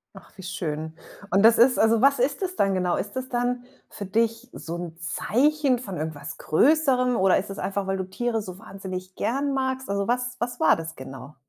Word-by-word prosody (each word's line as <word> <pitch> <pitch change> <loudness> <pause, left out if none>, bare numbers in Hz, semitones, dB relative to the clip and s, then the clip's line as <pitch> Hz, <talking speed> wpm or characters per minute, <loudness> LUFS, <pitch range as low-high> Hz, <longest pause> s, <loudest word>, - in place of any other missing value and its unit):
Ach, - - -14
wie 190 - -10
schön. 160 -4 -4 0.4
Und 195 +3 +4
das 230 +1 +7
ist 250 +2 +5
also, 225 0 +4
was 275 0 +4
ist 275 +6 0
das 370 -1 -2
dann 195 -1 +2
genau? 180 -1 +1
Ist 205 +1 -4
das 260 0 -4
dann 245 0 -1 0.3
für 200 - -7
dich 230 +4 0
so 170 - -6
'n 170 -2 -7
Zeichen 260 - +1
von 195 -7 -6
irgendwas 150 -2 -5
Größerem 255 - +3
oder 190 0 +4
ist 195 - -3
das 195 - -6
einfach, 195 0 -2
weil 195 - 0
du 190 - -2
Tiere 225 +4 -2
so 185 -3 -8
wahnsinnig 185 -2 -8
gern 275 +3 -1
magst? 260 -1 -2
Also, 200 +1 -1
was 245 +1 -1
was 245 +1 -3
war 160 - +5
das 165 0 -7
genau? 135 +2 -10
210 Hz, 210 wpm, -25 LUFS, 185-250 Hz, 0.4 s, das